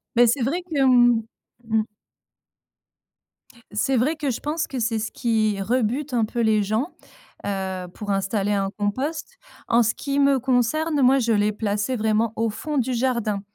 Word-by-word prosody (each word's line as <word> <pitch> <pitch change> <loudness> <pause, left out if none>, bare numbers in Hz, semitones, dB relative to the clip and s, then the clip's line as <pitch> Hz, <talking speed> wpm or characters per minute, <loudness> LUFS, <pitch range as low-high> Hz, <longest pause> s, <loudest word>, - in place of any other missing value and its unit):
Ben 240 0 +6
c'est 245 +3 +1
vrai 305 +9 -1
que, 345 -3 -10
hem, 245 -4 +5 0.4
mmh 220 -1 +2 1.9
c'est 255 +5 +1
vrai 275 +8 +1
que 300 -3 -2
je 245 - -2
pense 310 +2 -2
que 265 - -5
c'est 225 -1 0
ce 220 - -4
qui 215 -4 0
rebute 250 +6 -1
un 230 -2 +2
peu 235 +2 -3
les 215 -2 +3
gens, 220 - -1 0.6
heu, 190 -2 -3
pour 210 -1 -5
installer 195 +1 0
un 195 -1 0
compost. 285 - -3 0.3
En 235 0 +4
ce 230 +1 +1
qui 280 0 -2
me 280 -1 +4
concerne, 270 +5 +1
moi 265 +1 +5
je 235 -2 0
l'ai 210 0 +2
placé 210 +3 -1
vraiment 220 0 +1
au 225 0 0
fond 295 +8 -4
du 255 0 0
jardin. 235 -5 0
235 Hz, 175 wpm, -23 LUFS, 215-265 Hz, 1.9 s, Ben